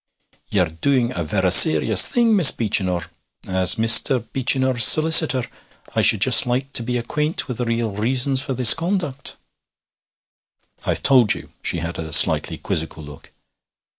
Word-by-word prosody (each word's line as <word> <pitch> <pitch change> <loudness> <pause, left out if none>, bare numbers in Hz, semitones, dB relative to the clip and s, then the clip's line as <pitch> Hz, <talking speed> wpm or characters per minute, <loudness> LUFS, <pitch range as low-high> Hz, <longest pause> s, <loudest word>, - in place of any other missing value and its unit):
'Ye're 95 -4 -2 0.2
doing 130 -4 -3
a 85 - -6
verra 95 +3 -4
serious 155 - +6
thing, 235 -2 -2
Miss 175 -9 +6
Beechinor. 95 -6 -4 0.4
As 95 +1 +1
Mr. 115 +1 +3
Beechinor's 130 -1 -1
solicitor, 155 -3 +4 0.5
I - - -3
should - - +1
just - - +2
like 130 +3 -6
to - - 0
be 125 +1 -6
acquaint 150 +7 -6
with 125 - -9
the 125 - -5
real 115 -1 -5
reasons 130 +5 -1
for 135 -2 -8
this 125 -2 +6
conduct.' 165 -6 -7 1.5
'I've - - -5
told 125 -6 +1
you.' - - -15
She - - -4
had 85 +1 -9
a 80 -1 -10
slightly - - +2
quizzical 80 0 -6
look. 75 -1 -17
120 Hz, 150 wpm, -16 LUFS, 100-135 Hz, 1.5 s, serious